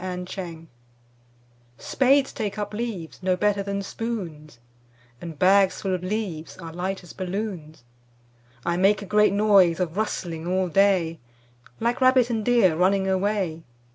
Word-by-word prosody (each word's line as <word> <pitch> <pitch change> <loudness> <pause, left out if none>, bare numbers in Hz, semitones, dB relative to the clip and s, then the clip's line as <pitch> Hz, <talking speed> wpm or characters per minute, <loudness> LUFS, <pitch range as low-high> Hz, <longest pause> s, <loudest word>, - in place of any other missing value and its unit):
5 180 -1 -4
Autoplay 170 -3 -7 1.1
Spades 270 - +2
take 210 -3 -4
up 205 0 -4
leaves 210 -8 -5
No 185 0 +1
better 205 0 +1
than 200 0 -3
spoons, 180 - -6 0.6
And 165 -3 -8
bags 190 +3 +4
full 190 -2 -1
of 180 - -2
leaves 185 -5 -4
Are 165 -2 -9
light 185 +2 -4
as 175 - -12
balloons. 180 - -5 0.8
I 170 0 0
make 200 +3 +3
a - - -7
great 210 +2 +3
noise 200 -4 +4
Of 175 -2 -2
rustling 170 -6 -3
all 185 0 0
day 180 -3 +2 0.6
Like 235 +3 -1
rabbit 255 -2 +4
and 220 -2 -1
deer 225 -8 +3
Running 190 +3 +2
away. 190 -3 -1
190 Hz, 145 wpm, -24 LUFS, 175-210 Hz, 1.1 s, bags